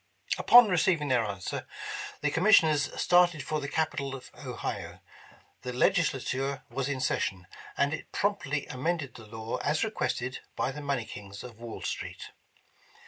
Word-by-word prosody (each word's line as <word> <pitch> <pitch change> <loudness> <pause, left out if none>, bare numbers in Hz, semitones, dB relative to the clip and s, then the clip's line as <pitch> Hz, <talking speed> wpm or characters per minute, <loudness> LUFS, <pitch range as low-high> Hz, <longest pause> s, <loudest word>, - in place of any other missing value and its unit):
Upon 245 -1 +9
receiving 170 -5 +2
theii* 120 -4 +2
answer, 95 -3 -4 0.5
the 150 - +1
commissioners 160 -6 +5
started 175 -5 +4
for 155 +3 -1
the 140 - -3
Capital 140 -4 -1
of 130 - -11
Ohio. - - -5 0.6
The 125 - -5
Legislature 135 -3 +1
was 135 +2 -2
in 135 -2 -2
session, 95 -7 -1 0.3
and 140 +2 +2
it 160 - -6
promptly 150 -8 0
amended 145 +1 -2
the 115 -4 -12
law 110 +1 -4
as 150 +2 0
re 220 - -1
quested 130 - -2 0.2
by 130 - 0
the 150 +2 -7
money 140 -5 -1
kings 100 -1 -9
of 120 -3 -11
"Wall 120 -1 -7
Street. - - -5
140 Hz, 150 wpm, -29 LUFS, 125-160 Hz, 0.6 s, Upon